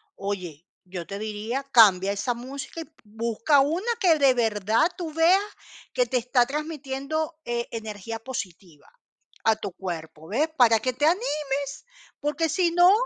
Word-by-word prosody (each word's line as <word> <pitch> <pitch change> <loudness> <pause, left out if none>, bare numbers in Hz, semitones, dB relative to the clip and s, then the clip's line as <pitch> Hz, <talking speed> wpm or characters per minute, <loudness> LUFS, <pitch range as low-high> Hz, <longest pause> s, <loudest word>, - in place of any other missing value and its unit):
oye, 180 -5 -5 0.2
yo 180 -2 -6
te 200 - -5
diría, 215 +5 -3
cambia 200 -4 +6
esa 205 +4 -1
música 275 +6 -7
y - - -4
b 320 - -23
busca 230 +6 +1
una 325 - 0
que 335 -6 +4
de 270 -3 +5
verdad 220 - +2
tú 335 -3 -5
veas 335 +5 +5 0.5
que - - +2
te 255 - 0
está 245 +1 +2
transmitiendo 300 +2 -4
e 235 -2 -2
energía 220 0 -6
positiva 190 - -8 0.6
a 220 -1 +4
tu 205 -2 -6
cuerpo, 160 -4 -7
¿ves? 275 - +1
Para 230 -3 +6
que 255 +3 -1
te 275 +5 0
animes, 295 - -1 0.4
porque, 300 +2 0
si 340 +2 +2
no 355 +2 +6
245 Hz, 155 wpm, -25 LUFS, 210-300 Hz, 0.6 s, cambia